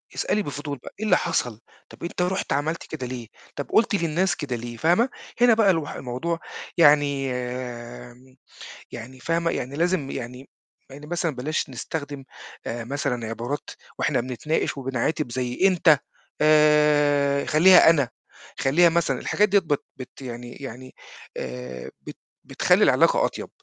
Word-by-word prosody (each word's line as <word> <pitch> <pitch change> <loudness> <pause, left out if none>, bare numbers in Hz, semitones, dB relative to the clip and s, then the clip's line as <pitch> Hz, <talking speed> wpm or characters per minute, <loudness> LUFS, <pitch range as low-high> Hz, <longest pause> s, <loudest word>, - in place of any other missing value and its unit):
اسألي 210 - 0
بفضول 145 -1 -5
بقى: - - -10
"إيه 220 - -2
اللي 215 - +4
حصل؟ 120 -10 -2 0.3
طَب - - -14
أنت 175 - -3
رُحت 185 +2 -1
عملت 155 +4 -1
كده 130 -5 -5
ليه؟ 120 -2 -6 0.3
طُب 145 - -4
قُلت 220 -1 +4
للناس 170 +1 +1
كده 140 -5 -4
ليه؟"، 120 0 -7
فاهمة؟ 180 - +3 0.3
هنا 245 -2 +7
بقى 220 -3 +4
الوح 160 -4 -2
الموضوع 135 +7 -3 0.4
يعني 145 -3 +4
يعني 125 0 -6 0.6
يعني 125 +2 -9
فاهمة؟ 165 +3 0
يعني 130 +3 -4
لازم 170 -3 0
يعني 125 +3 -7 0.4
يعني 145 +2 -11
مثلًا 170 -3 -2
بلاش 145 +5 -2
نستخدم 140 +2 -6 0.4
آآ 115 0 -4
مثلًا 125 -3 -2
عبارات 120 +6 -4 0.3
وإحنا 130 -4 +1
بنتناقش 130 +5 -2
وبنعاتب 135 +2 -2
زي 125 0 -3
أنت، 170 -6 +4 0.4
آآ 150 -2 +4
خلّيها 170 +3 +7
أنا، 145 -7 +3 0.5
خلّيها 170 +6 +4
مثلًا 170 0 0
الحاجات 210 0 +1
ديّة 200 +1 +5
بت 150 -5 -2
بت 130 +1 -10
يعني 120 -1 -7
يعني 130 -1 -9 0.4
آآ 65 0 -6
بت - - -10 0.3
بتخلّي - - +2
العلاقة - - +4
أطيب، - - -5
145 Hz, 145 wpm, -24 LUFS, 125-165 Hz, 0.6 s, هنا